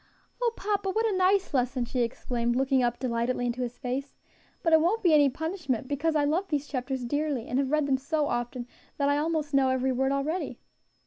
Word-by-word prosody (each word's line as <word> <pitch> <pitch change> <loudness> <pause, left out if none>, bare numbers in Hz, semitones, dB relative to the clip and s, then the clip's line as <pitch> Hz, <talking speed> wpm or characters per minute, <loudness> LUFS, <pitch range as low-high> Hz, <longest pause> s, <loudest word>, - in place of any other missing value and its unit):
"O 475 -1 +2
papa! 405 -1 -1
what 445 +4 +1
a 430 -3 +1
nice 375 -1 +2
lesson!" 255 -1 +1
she 250 +2 -3
exclaimed, 235 0 -1
looking 265 0 +2
up 240 -1 +1
delightedly 245 0 -1
into 245 +1 -2
his 245 -1 -4
face; 270 +1 -4 0.5
"but 330 - +2
it 320 - +7
won't 380 +8 +1
be 345 -4 +5
any 290 -2 +6
punishment, 295 - -3
because 295 +3 0
I 295 - +3
love 340 +7 0
these 295 -2 -1
chapters 260 -2 -3
dearly, 285 -2 -1
and 250 - 0
have 275 -1 0
read 305 0 +2
them 270 -1 +2
so 300 +2 0
often 240 0 -3 0.3
that 280 -1 +2
I 285 +1 +2
almost 305 -1 -1
know 270 -1 +4
every 260 0 +1
word 265 +1 +1
already." 295 +6 -2
275 Hz, 210 wpm, -28 LUFS, 250-315 Hz, 0.5 s, it